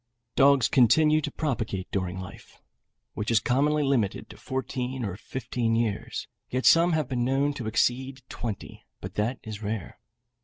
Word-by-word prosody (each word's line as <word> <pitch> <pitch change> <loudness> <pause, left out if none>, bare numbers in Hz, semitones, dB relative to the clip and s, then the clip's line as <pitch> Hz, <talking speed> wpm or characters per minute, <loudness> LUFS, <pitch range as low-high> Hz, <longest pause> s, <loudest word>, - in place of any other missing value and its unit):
Dogs 140 -2 +5
continue 150 +5 +5
to - - -3
propagate 115 -10 -3
during 95 -1 -2
life, 95 0 -11 0.5
which 105 - -3
is 115 -2 +4
commonly 145 +5 +2
limited 125 -8 0
to - - -12
fourteen 130 +2 -3
or 95 -3 -3
fifteen 115 +1 -2
years, 115 -3 -2 0.2
yet 130 +1 -2
some 170 +1 +6
have 155 -4 +1
been 125 -2 -1
known 135 +3 +1
to 125 -6 -5
exceed 130 +4 0
twenty, 110 -5 -6 0.2
but - - -7
that 115 +5 -1
is 110 -1 -7
rare. 110 0 -4
125 Hz, 155 wpm, -27 LUFS, 110-135 Hz, 0.5 s, some